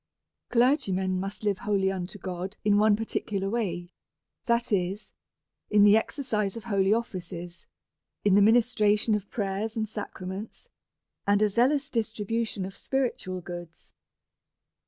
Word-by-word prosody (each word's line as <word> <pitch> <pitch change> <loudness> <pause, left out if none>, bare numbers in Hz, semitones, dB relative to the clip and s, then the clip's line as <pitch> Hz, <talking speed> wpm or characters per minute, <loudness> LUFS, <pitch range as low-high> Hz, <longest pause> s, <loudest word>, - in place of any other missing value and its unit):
Clergymen 195 -8 +2
must 195 +3 -5
live 205 -2 0
wholly 195 -2 +1
unto 185 +1 -5
God 185 +1 -5
in 205 -1 +4
one 215 0 +5
parti 225 +1 -1
cular 195 -1 -3
way,, 175 -6 -2 0.5
that 235 -1 +1
is, 190 +2 -1 0.6
in 210 -1 +5
the 205 0 +7
exercise 220 -4 -1
of 230 - -7
holy 200 -3 +1
offices, 180 -6 -3 0.6
in 200 - +5
the 205 - +6
ministration 220 -1 +4
of 205 -1 -2
prayers 210 +2 -2
and 220 -1 0
sacraments, 205 - -7 0.6
and 200 0 +4
a 210 - +4
zealous 270 +7 +2
distribution 220 -2 -2
of 190 - -8
spiritual 235 -9 -2
goods. 175 -1 -9
205 Hz, 135 wpm, -27 LUFS, 190-225 Hz, 0.6 s, the